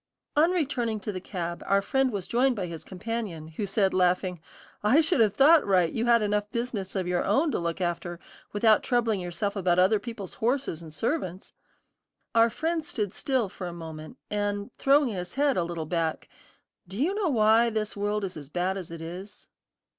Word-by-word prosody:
On 310 +3 +5
returning 260 -11 -1
to 210 - -3
the 185 -2 -6
cab, 175 -3 -5
our 200 0 +3
friend 265 +3 +1
was 200 -4 -4
joined 250 +2 +2
by 195 -4 -2
his 170 -2 -7
companion, 195 -5 -5
who 200 +6 -4
said 195 0 +1
laughing, 180 -1 +1 0.4
"I 230 +9 +4
should 325 0 +2
have 215 -3 +4
thought, 305 +3 +6
Wright, 180 -4 +2
you 230 +1 -1
had 235 -2 +5
enough 210 0 0
business 235 -5 -3
of 190 -2 0
your 180 -1 +1
own 300 +2 +2
to - - -1
look 170 0 -2
after, 175 -1 -3 0.3
without 215 +1 +4
troubling 235 -5 +1
yourself 180 +3 -3
about 180 -3 +1
other 190 +4 +4
people's 225 -6 -7
horses 240 - -1
and 160 -2 -10
servants." 185 - -3 0.8
Our 230 0 +5
friend 325 +7 -1
stood 210 -9 -3
still 260 -6 0
for 185 -1 -7
a 175 - -6
moment, 160 +4 -9
and 205 -1 -2
throwing 280 -1 +4
his 180 -2 -5
head 280 0 +2
a 175 - +1
little 170 -1 -4
back, 160 0 -2 0.6
"Do 190 +4 -7
you 330 +8 +2
know 405 -4 0
why 225 -2 +4
this 215 -2 -2
world 205 +1 -1
is 190 -2 -4
as 145 -3 -9
bad 180 +4 -1
as 185 -4 -7
it 165 -1 -8
is?" 180 +5 -8
205 Hz, 195 wpm, -27 LUFS, 180-235 Hz, 0.8 s, thought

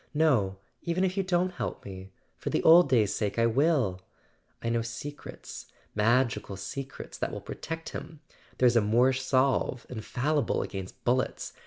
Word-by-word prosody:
No, 125 -12 +3 0.2
even 170 +2 0
if 185 -1 +1
you 195 - +2
don't 185 -1 +1
help - - -5
me—for 95 -1 -9
the - - 0
old 170 +2 +8
days' 110 -6 +3
sake, 105 0 -2
I 115 - +4
will! 120 - +2 0.6
I 115 - -2
know 115 0 +1
secrets... 120 +6 -8 0.3
magical 115 -2 +1
secrets 135 +8 -7
that - - -1
will - - -5
protect 165 +1 -6
him. 160 -2 -8 0.4
There's 125 -1 +4
a 115 - +6
Moorish 125 +5 +3
salve, 130 -1 +1
infallible 125 +4 0
against 95 -2 -7
bullets 125 +1 0
125 Hz, 150 wpm, -29 LUFS, 110-155 Hz, 0.6 s, old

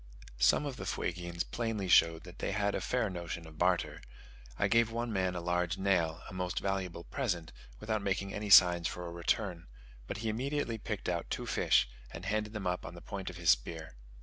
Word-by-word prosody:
Some 60 - +4
of 140 -3 -4
the 90 - -6
Fuegians 85 -1 -2
plainly 115 -3 -2
showed 85 -2 +5
that 90 0 -12
they - - -1
had 100 0 +1
a - - -1
fair 125 -3 0
notion 85 -3 -5
of 80 -1 -13
barter. 90 0 +1 0.6
I - - +2
gave 115 -1 +4
one 115 0 -2
man 95 -2 0
a 90 - -3
large 90 0 0
nail 85 -4 +1
(a - - -9
most 90 0 -3
valuable 95 -3 -2
present) 85 -3 -2 0.3
without 110 - -1
making 100 0 -1
any 105 0 -4
signs 90 -4 +8
for 90 +2 -5
a 85 - -5
return; 85 +1 -1 0.4
but - - -4
he 110 0 -2
immediately 125 0 -1
picked 105 -1 -4
out 85 -1 -2
two - - -3
fish, - - +3 0.2
and 85 +2 -8
handed 105 +1 -1
them 105 -3 -4
up 90 0 -1
on - - -8
the - - -8
point 95 -2 -5
of 90 - -9
his 85 -2 +5
spear. 80 -3 -2
90 Hz, 205 wpm, -32 LUFS, 85-105 Hz, 0.6 s, signs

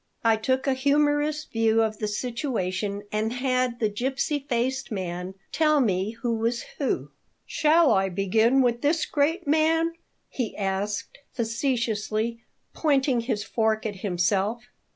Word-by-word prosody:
I 225 -1 +5
took 260 +4 0
a 270 - +2
humorous 290 +2 +1
view 225 0 +2
of 215 -1 -2
the 215 - -1
situation 210 -4 -2
and 215 +2 -1
had 255 -1 0
the 220 - +2
gipsy 265 +7 -1
faced 260 +2 -1
man 180 -1 -4 0.2
tell 305 -2 +3
me 200 -3 +1
who 240 -1 +1
was 230 +2 -1 0.2
who 280 - -1 0.3
"Shall 315 0 +4
I 195 0 +2
begin 220 +8 +3
with 240 -1 +1
this 315 +3 +2
great 320 +5 0
man?" 325 +2 +2 0.3
he 245 -5 -4
asked, 200 +1 -2
facetiously, 230 -2 -1 0.3
pointing 270 -5 +2
his 230 -3 -2
fork 220 0 0
at 205 -3 -3
himself. 195 +4 0
235 Hz, 135 wpm, -26 LUFS, 210-275 Hz, 0.3 s, I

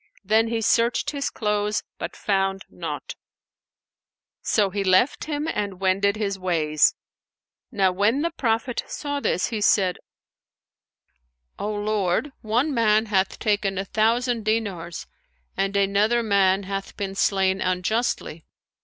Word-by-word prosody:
Then 220 +3 +3
he 225 0 -1
searched 230 +2 +2
his 280 -2 -2
clothes, 210 -1 -1 0.2
but - - -5
found 195 -1 -1
naught; - - -6 1.3
so 205 -3 +1
he 200 +1 -1
left 190 +8 +3
him 300 0 -3
and 200 - -3
wended 195 +2 +2
his 200 -2 -2
ways. 155 -5 +2 0.8
Now 195 -5 +2
when 210 +10 +1
the 335 - 0
Prophet 235 -4 -1
saw 285 -1 -3
this, 185 - 0
he 220 -3 -3
said, 190 -3 +3 1.6
"O 210 - -2
Lord, 205 +4 0
one 245 +8 0
man 220 -2 +3
hath 190 0 +1
taken 205 -3 0
a 195 - -2
thousand 230 +3 +1
dinars 200 -6 -2 0.5
and 195 +1 0
another 205 +4 +2
man 200 -2 +3
hath 195 0 -5
been 195 -1 -3
slain 190 -1 +1
unjustly." 185 -2 -1
205 Hz, 125 wpm, -24 LUFS, 195-225 Hz, 1.6 s, Then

